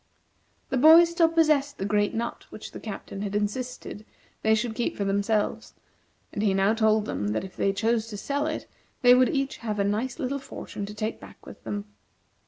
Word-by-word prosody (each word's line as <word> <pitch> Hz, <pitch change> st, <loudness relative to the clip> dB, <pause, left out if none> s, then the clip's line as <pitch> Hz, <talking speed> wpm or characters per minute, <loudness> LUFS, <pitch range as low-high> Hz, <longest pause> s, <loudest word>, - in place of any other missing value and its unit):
The 265 Hz, -, 0 dB
boys 325 Hz, +5 st, +8 dB
still 335 Hz, -1 st, +3 dB
possessed 305 Hz, -4 st, +2 dB
the 195 Hz, -, -3 dB
great 205 Hz, 0 st, +1 dB
nut 235 Hz, +1 st, -4 dB
which -, -, -9 dB
the -, -, -8 dB
Captain 200 Hz, -2 st, -7 dB
had 205 Hz, -1 st, -3 dB
insisted 215 Hz, +1 st, -3 dB, 0.4 s
they 220 Hz, 0 st, +4 dB
should 225 Hz, +1 st, -1 dB
keep 240 Hz, +1 st, -2 dB
for 200 Hz, -, -1 dB
themselves, 200 Hz, +2 st, -1 dB, 0.6 s
and 205 Hz, -, -2 dB
he 200 Hz, -3 st, +2 dB
now 195 Hz, +2 st, +3 dB
told 220 Hz, -1 st, +2 dB
them 105 Hz, -, -3 dB
that 110 Hz, -, -1 dB
if 190 Hz, -, -9 dB
they 195 Hz, -, +1 dB
chose 225 Hz, +2 st, 0 dB
to 210 Hz, -2 st, -7 dB
sell 285 Hz, +8 st, -2 dB
it, 310 Hz, -, -4 dB, 0.4 s
they 245 Hz, 0 st, +8 dB
would 255 Hz, 0 st, +5 dB
each 275 Hz, -1 st, -1 dB
have 215 Hz, -3 st, -4 dB
a 200 Hz, -, +2 dB
nice 215 Hz, +6 st, -1 dB
little 280 Hz, -2 st, -2 dB
fortune 205 Hz, -6 st, -7 dB
to 210 Hz, -, -8 dB
take 215 Hz, +1 st, -3 dB
back -, -, -14 dB
with -, -, -12 dB
them. 205 Hz, 0 st, -4 dB
220 Hz, 200 wpm, -26 LUFS, 205-260 Hz, 0.6 s, boys